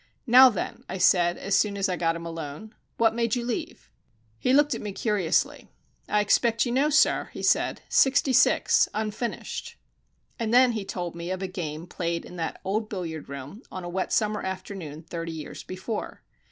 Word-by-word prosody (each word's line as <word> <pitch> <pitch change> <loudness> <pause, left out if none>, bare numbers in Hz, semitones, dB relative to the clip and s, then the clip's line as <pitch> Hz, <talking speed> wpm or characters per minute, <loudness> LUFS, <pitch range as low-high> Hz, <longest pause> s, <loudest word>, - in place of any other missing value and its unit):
"Now, 255 +1 +9
then," 210 - -5
I 190 - -3
said, 175 -1 +4
as 195 0 0
soon 200 0 +2
as 195 - +1
I - - -2
had - - -4
got 165 -1 +1
him 170 0 -7
alone, 165 +5 -7 0.2
"what 225 -1 +3
made 235 0 0
you 240 -1 -3
leave?" 230 - -5 0.5
He 255 - +1
looked 290 +2 +4
at - - -5
me 205 -2 -5
curiously. 200 -6 0 0.4
"I 210 - +3
expect 230 +3 +2
you 240 - -2
know, 275 +4 +2
sir," 310 +1 +3
he - - -7
said. - - +2
"Sixty 270 0 +3
six. - - +4
Unfinished." 220 +2 -4 0.6
And 225 -2 -1
then 250 +1 +6
he 215 -4 -4
told 175 -3 -4
me 170 +1 -6
of 185 +1 -3
a - - -1
game 165 -4 -5
played 170 -1 -3
in - - -11
that 165 -1 -3
old 215 +3 -1
billiard 165 -7 -5
room 140 - -8
on 185 - -6
a 175 - -5
wet 185 +1 -2
summer 215 -1 +1
afternoon 185 -5 -6
thirty 165 0 -5
years 155 -2 -7
before. 190 +4 -6
195 Hz, 195 wpm, -26 LUFS, 170-225 Hz, 0.6 s, Now